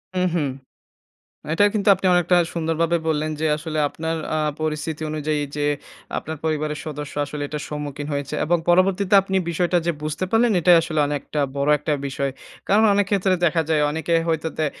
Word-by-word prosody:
হু, - - +1 0.2
হু। 170 - +1 1.1
এটা 205 +5 +4
কিন্তু 210 -1 +1
আপনি 190 0 -3
অনেকটা 175 +1 +3 0.2
সুন্দরভাবে 165 0 0
বললেন 155 0 0
যে, 160 - +1
আসলে 155 0 -5
আপনার 160 +2 -3 0.2
আ - - +1 0.2
পরিস্থিতি 155 0 -3
অনুযায়ী, 150 -1 -1
যে 145 - 0 0.5
আপনার 160 +1 -6
পরিবারের 155 -1 -1
সদস্য 150 -1 -6
আসলে 145 0 -6
এটার 150 -1 -5
সম্মুখীন 145 -1 -5
হয়েছে। 140 +1 -3
এবং 175 +2 +2
পরবর্তীতে 190 +2 +3
আপনি 190 0 -2
বিষয়টা 175 +1 +1
যে 170 - +2
বুঝতে 155 +3 -2
পারলেন, 225 +1 +3
এটাই 175 +1 +6
আসলে 155 -2 -1
অনেকটা 145 +1 -3 0.2
বড় 140 +2 +1
একটা 150 +1 -2
বিষয়। 140 0 -2 0.4
কারণ, 215 +2 +4
অনেক 200 -1 +2
ক্ষেত্রে 195 -2 +2
দেখা 165 0 +2
যায়, 155 -1 +3
অনেকে 160 +2 -1
হয়তো 160 0 0
দে 155 - +1
160 Hz, 175 wpm, -22 LUFS, 150-175 Hz, 1.1 s, এটাই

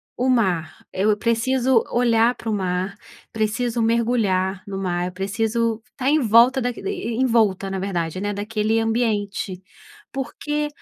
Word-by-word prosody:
o 255 +2 0
mar 190 -10 0
eu 205 +2 +2
preciso 240 +2 +2
olhar 235 0 +3
pro 225 -2 -4
mar 185 0 -2 0.4
preciso 230 +2 -1
mergulhar 220 -5 +1
no 195 -1 -5
mar, 180 -2 -1
eu - - -5
preciso 225 +4 -1
estar 260 +2 -2
em 310 - +4
volta 240 +2 +5
da 245 - 0
envolta 230 - 0
na 190 - -2
verdade 185 -2 -2
né 205 0 -1
daquele 215 +2 0
ambiente. 215 -4 -1 0.5
Porque 295 +2 -3
225 Hz, 135 wpm, -22 LUFS, 195-240 Hz, 0.5 s, volta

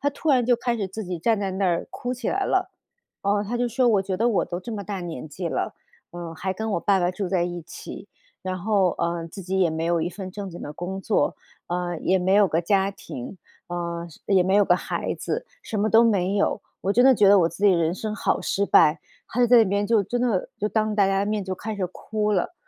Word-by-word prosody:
她 285 - +1
突 305 +3 -5
然 255 -3 +4
就 245 +1 +4
开 240 0 -1
始 205 -3 -2
自 205 +3 -6
己 180 -1 -4
站 220 +5 +1
在 195 -1 -1
那 190 +1 0
儿 170 -2 0
哭 245 - -4
起 250 -2 -4
来 390 +1 0
了， 375 -1 0 0.5
呃， 205 +1 +1
她 230 +4 -3
就 245 +1 +1
说： 245 +1 +2
“我 205 -4 +3
觉 190 -1 -3
得 230 +5 +2
我 215 - +2
都 175 0 -5
这 230 +5 -7
么 205 -2 -5
大 195 -1 -4
年 165 -6 -6
纪 170 +4 -4
了， - - -2 0.4
嗯， 170 -1 -7
还 190 +3 -3
跟 220 +3 -3
我 170 - 0
爸 195 0 +2
爸 175 0 +2
住 185 0 -4
在 180 -2 +1
一 175 -1 -5
起， 190 +4 -10 0.3
然 185 -1 -3
后， 195 -1 +2
呃， 170 -1 -1
自 195 +4 -9
己 190 +2 -2
也 180 -3 +3
没 160 0 -3
有 170 -1 +1
一 170 - -2
份 190 0 -7
正 195 0 -6
经 175 - -9
的 145 - -6
工 190 +4 -5
作， 205 +1 +1 0.3
呃， 175 -1 -2
也 190 - +2
没 185 +1 +1
有 205 0 +6
个 165 -2 0
家 195 +2 +2
庭， 185 -3 -9 0.3
呃， 170 -1 -4
是 155 - -17
也 190 -2 +4
没 190 +2 +1
有 205 0 +5
个 175 - +4
孩 - - -3
子， - - -4 0.2
什 215 - -3
么 215 - +2
都 225 +1 +6
没 200 -3 +2
有。 200 - +1 0.2
我 195 - +1
真 245 +4 +4
的 265 - +8
觉 210 -5 +4
得 200 -1 +7
我 165 - +3
自 170 +5 -4
己 200 - +6
的 - - +3
人 165 -1 +1
生 215 +2 -4
好 210 - 0
失 200 - 0
败。” 155 -3 +5 0.3
她 245 - -1
就 245 - +5
在 240 0 +7
那 225 - +6
边 200 +2 0
就 220 -1 +3
真 240 +5 -2
的 225 -7 0
就 210 - 0
当 215 -1 0
大 205 -2 +4
家 195 0 +1
的 200 - 0
面 210 -1 -1
就 190 0 -3
开 215 +3 -5
始 190 -2 -1
哭 210 +3 -2
了。 190 - 0
195 Hz, 290 characters per minute, -24 LUFS, 175-215 Hz, 0.5 s, 的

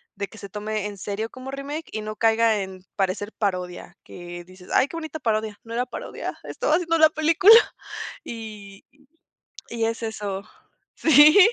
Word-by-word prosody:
de 200 0 -3
que 220 - -15
se 200 - -9
tome 210 +1 -3
en 205 -1 -8
serio 205 +3 -3
como 255 +1 -9
remake, 285 +4 -5
y 215 - -3
no 215 0 -5
caiga 225 0 +3
en 190 -1 -8
parecer 195 +2 -1
parodia. 180 -4 -3
Que 175 0 -9
dices: 185 0 -15
"Ay, 260 - +4
qué 330 - -7
bonita 315 -1 -5
parodia". 215 -4 -1
"No 230 - -9
era 245 +2 0
parodia. - - -6
Estaba 305 - 0
haciendo 330 -1 +1 0.2
película". 330 +7 +7 0.7
Y 210 -4 -9 0.9
y 230 -1 -1
es 225 +1 -3
eso. 205 -3 -4 0.5
Sí. 305 +3 +7
220 Hz, 160 wpm, -24 LUFS, 200-265 Hz, 0.9 s, película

